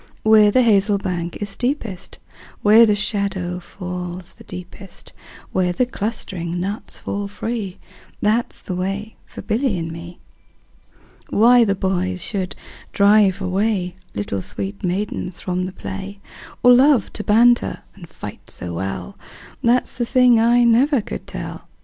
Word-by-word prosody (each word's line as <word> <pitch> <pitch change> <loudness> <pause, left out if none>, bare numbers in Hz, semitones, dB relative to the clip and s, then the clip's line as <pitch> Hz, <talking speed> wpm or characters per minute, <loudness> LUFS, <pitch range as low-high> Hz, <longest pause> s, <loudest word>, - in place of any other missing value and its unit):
Where 220 -1 +6
the 255 +5 +4
hazel 205 -2 +3
bank 175 -3 -3
is 205 - -4
steepest, 230 -4 -3 0.5
Where 220 +2 +7
the 210 - +3
shadow 200 -4 -2
falls 180 0 -7
the - - -16
deepest, 180 +2 -11 0.4
Where 185 -1 +1
the 245 +8 +1
clustering 190 -7 -4
nuts 200 +3 -4
fall 200 0 -4
free, 210 -1 -4 0.4
15 - - -35
That 225 +3 +2
's - - -6
the 185 - -5
way 195 +4 -3
for - - -10
Billy 225 -1 0
and 165 -1 -4
me. 170 +1 -9 1.1
Why 240 +3 +6
the 200 -3 +1
boys 185 -1 -1
should 190 -3 -3 0.4
drive 200 -1 +4
away 190 -1 0 0.2
Little 100 -1 -2
sweet 100 +1 -4
maidens 185 -1 -2
from 180 0 -2
the - - -6
play, 195 +2 -7 0.4
Or 245 0 +8
love 260 -2 +4
to 210 - -5
banter 240 +3 +3
and 175 -5 -13
fight 105 -10 -9
so 90 -1 -4
well, 95 +1 -4 0.5
That 240 +2 +3
's - - -8
the 240 - 0
thing 250 -2 +5
I 240 +2 +4
never 245 +3 +4
could - - -7
tell. - - -7
200 Hz, 150 wpm, -20 LUFS, 180-225 Hz, 1.1 s, Or